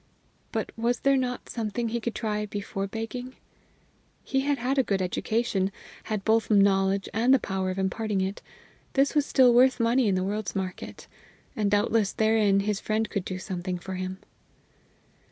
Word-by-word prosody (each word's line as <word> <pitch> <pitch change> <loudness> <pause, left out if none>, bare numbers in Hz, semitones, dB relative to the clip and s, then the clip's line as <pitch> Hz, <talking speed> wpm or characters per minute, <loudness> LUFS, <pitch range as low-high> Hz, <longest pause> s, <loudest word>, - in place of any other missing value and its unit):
But - - -2
was 235 +1 0
there 275 0 +4
not 250 -2 -2
something 230 +1 -3
yet - - -7
he 235 - 0
could 235 0 -3
try 210 -1 -2
before 200 -1 -4
begging? 245 +4 -6 0.9
He 270 - 0
had 285 +1 +1
had 265 +3 0
a - - +4
good 200 -4 0
education, 195 +1 0 0.3
had 215 -3 -3
both 225 0 +2
knowledge 195 -1 +3
and 235 +4 +3
the 270 - +7
power 190 -3 -2
of 185 - -3
imparting 200 +2 -1
it; 190 +1 -2 0.5
this 275 0 +3
was 295 -2 +2
still 255 -3 +5
worth 255 +2 +5
money 235 +1 +3
in 195 - +2
the 185 - 0
world's 205 +2 -3
market. 185 -2 -5 0.5
And 210 -2 +1
doubtless 205 0 +2
therein 215 -3 +3
his 205 0 -1
friend 215 0 -1
could 200 - -1
do 185 - -4
something 185 -1 -4
for 190 +2 -7
him. 185 0 -4
215 Hz, 175 wpm, -27 LUFS, 195-240 Hz, 0.9 s, the